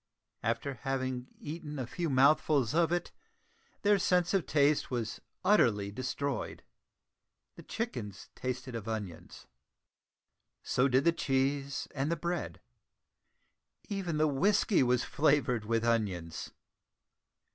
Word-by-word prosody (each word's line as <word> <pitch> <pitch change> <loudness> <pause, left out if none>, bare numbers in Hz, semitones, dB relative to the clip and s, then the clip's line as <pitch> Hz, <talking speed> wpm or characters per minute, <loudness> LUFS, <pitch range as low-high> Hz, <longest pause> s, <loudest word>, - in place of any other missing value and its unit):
After 115 +5 -1
having 130 -2 -2
eaten 150 -1 -6
a 130 - -2
few 155 +8 -3
mouthfuls 140 -1 +4
of 165 0 +3
it, 175 -1 -1 0.7
their 205 -1 +4
sense 180 -1 +2
of 190 -4 +1
taste 145 0 +3
was 120 -4 -3 0.2
utterly 105 - +3
destroyed! 130 +2 -3 0.9
The - - -10
chickens 115 - -5
tasted 130 0 -4
of 115 -2 -5
onions, 105 -7 -6 1.2
so 125 +2 +2
did 130 +1 +3
the 170 - +5
cheese 135 -2 -1
and 145 +2 -1
the - - +2
bread. 170 +2 -3 1.3
Even 190 -6 -2
the 155 0 +3
whiskey 195 +8 +3
was 125 -1 +3
flavoured 140 -7 +2
with 115 +1 0
onions. 100 -8 -1
135 Hz, 115 wpm, -31 LUFS, 120-160 Hz, 1.3 s, the